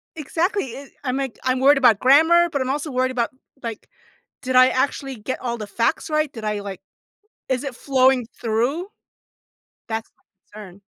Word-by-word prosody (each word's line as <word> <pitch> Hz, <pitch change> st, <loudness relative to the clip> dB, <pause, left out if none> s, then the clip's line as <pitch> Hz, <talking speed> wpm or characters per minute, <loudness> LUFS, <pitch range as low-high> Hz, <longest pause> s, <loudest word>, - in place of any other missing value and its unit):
Exactly, 325 Hz, -, -2 dB
i 275 Hz, -, -7 dB
i -, -, -16 dB, 0.2 s
I'm, 255 Hz, +1 st, -1 dB
like, 270 Hz, -3 st, -4 dB
I'm 255 Hz, 0 st, +1 dB
worried 280 Hz, +2 st, +6 dB
about 235 Hz, -6 st, +5 dB
grammar, 325 Hz, +6 st, +5 dB
but 280 Hz, -3 st, -1 dB
I'm 260 Hz, -, -2 dB
also 295 Hz, +2 st, -2 dB
worried 255 Hz, 0 st, 0 dB
about, 240 Hz, -2 st, 0 dB, 0.3 s
like, 230 Hz, -2 st, -6 dB, 0.6 s
did 255 Hz, -1 st, -1 dB
I 255 Hz, 0 st, +8 dB
actually 270 Hz, 0 st, -1 dB
get 220 Hz, +5 st, -5 dB
all 235 Hz, -2 st, -3 dB
the 210 Hz, -, -5 dB
facts 230 Hz, +9 st, -1 dB
right? 305 Hz, -2 st, 0 dB
Did 225 Hz, -2 st, -8 dB
I, 210 Hz, -1 st, -1 dB
like 195 Hz, -2 st, -7 dB, 0.7 s
is 260 Hz, +1 st, 0 dB
it 275 Hz, -3 st, -4 dB
flowing 260 Hz, -2 st, +2 dB, 0.2 s
through? 245 Hz, -, 0 dB, 1.0 s
That's 220 Hz, 0 st, -4 dB
my 205 Hz, +2 st, -17 dB
concern. 190 Hz, +2 st, -15 dB
255 Hz, 180 wpm, -22 LUFS, 230-280 Hz, 1.0 s, I